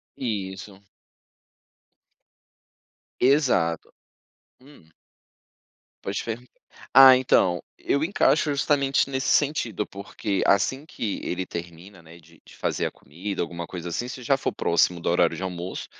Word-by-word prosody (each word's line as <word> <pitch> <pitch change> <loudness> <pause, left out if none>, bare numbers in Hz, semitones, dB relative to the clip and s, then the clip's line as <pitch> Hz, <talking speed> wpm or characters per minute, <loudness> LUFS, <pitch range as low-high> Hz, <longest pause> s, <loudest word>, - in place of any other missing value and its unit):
Isso. 95 -4 -5 2.4
Exato, 125 - +2 0.7
hum. 135 - -19 1.1
Pode 100 +1 -3
perguntar. 120 +2 -6 0.4
Ah, 135 -1 +10
então 95 -9 +2 0.2
eu 140 - 0
encaixo 160 -3 +2
justamente 140 -1 +1
nesse 130 0 -2
sentido, 120 -8 +1
porque 100 0 -4
assim 130 +9 +2
que 110 -9 -4
ele 90 +1 -3
termina, 85 +2 -9
né. 80 +1 -15
De 85 0 -21
de - - -16
fazer - - -1
a - - -3
comida, 95 +7 -6
alguma 85 0 -5
coisa 90 -1 -7
assim, 120 +8 -3
se 125 -1 -8
já 135 +3 +2
for - - -3
próximo 85 +1 +1
do - - -2
horário 85 - +2
de - - -7
almoço, 90 0 -5
100 Hz, 130 wpm, -25 LUFS, 85-130 Hz, 2.4 s, Ah